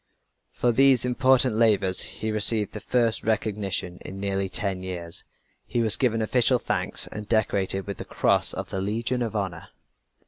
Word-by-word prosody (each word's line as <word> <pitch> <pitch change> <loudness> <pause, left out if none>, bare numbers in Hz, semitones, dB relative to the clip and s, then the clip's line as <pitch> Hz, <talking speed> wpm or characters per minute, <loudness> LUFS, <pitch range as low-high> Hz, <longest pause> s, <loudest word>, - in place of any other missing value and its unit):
For 120 - 0
these 130 0 +4
important 130 -1 +2
labors 100 -5 +3
he 110 - -3
received 110 0 +3
the - - -6
first 120 -3 0
recognition 100 -5 -3
in 95 - -9
nearly 100 -1 -2
ten 95 -1 0
years. 85 -2 -4 0.4
He 120 -2 -1
was 110 -1 +6
given 115 -4 0
official 125 +3 +2
thanks, - - -2
and 105 0 -8
decorated 100 -3 +1
with 100 -2 -6
the - - -6
cross - - +2
of - - -6
the 95 - -3
Legion 115 +5 -2
of 115 -2 -3
Honor. 100 -4 -4
110 Hz, 165 wpm, -25 LUFS, 95-120 Hz, 0.4 s, was